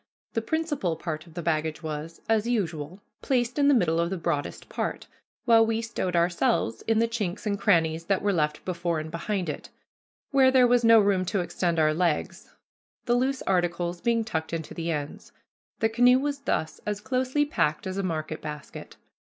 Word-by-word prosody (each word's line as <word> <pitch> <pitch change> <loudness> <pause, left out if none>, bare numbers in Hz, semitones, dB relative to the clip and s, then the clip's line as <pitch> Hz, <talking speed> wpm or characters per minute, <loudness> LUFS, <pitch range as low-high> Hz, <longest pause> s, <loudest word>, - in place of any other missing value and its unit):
The 225 - 0
principal 295 - -1
part 160 0 -5
of 165 - -17
the 175 - -4
baggage 155 -1 -1
was, 155 +1 -6
as 225 0 +2
usual, 180 -6 -2 0.2
placed 250 0 0
in 285 - +4
the 285 - +6
middle 165 -7 +2
of 170 0 +1
the 190 - -3
broadest 145 -3 -3
part, - - -3 0.4
while 230 -2 +6
we 225 0 0
stowed 225 -6 -3
ourselves 170 -9 +1
in 225 -1 +3
the 230 +1 +3
chinks 215 -5 -3
and 205 -1 +1
crannies 165 -4 +2
that 195 0 0
were 205 -1 +2
left 150 -3 -1
before 170 -2 -1
and 155 +1 -6
behind 180 +2 -2
it, 150 - -5 0.6
where 270 -2 +5
there 260 -1 +5
was 245 0 +3
no 230 0 +7
room 200 -3 +2
to 190 +1 0
extend 175 -1 -1
our 155 -1 +3
legs, 170 -2 -1 0.5
the 240 - +2
loose 260 +2 0
articles 175 -1 0
being 230 -1 +1
tucked 160 -7 -4
into 160 -2 -4
the 170 0 -4
ends. 150 -3 -5 0.5
The 225 - +3
canoe 245 +2 +5
was 285 +1 -2
thus 160 - -2
as 210 -1 -3
closely 260 +5 0
packed 155 - 0
as 190 +1 -3
a - - +1
market 155 -4 -3
basket. 150 -1 -8
185 Hz, 190 wpm, -26 LUFS, 160-230 Hz, 0.6 s, no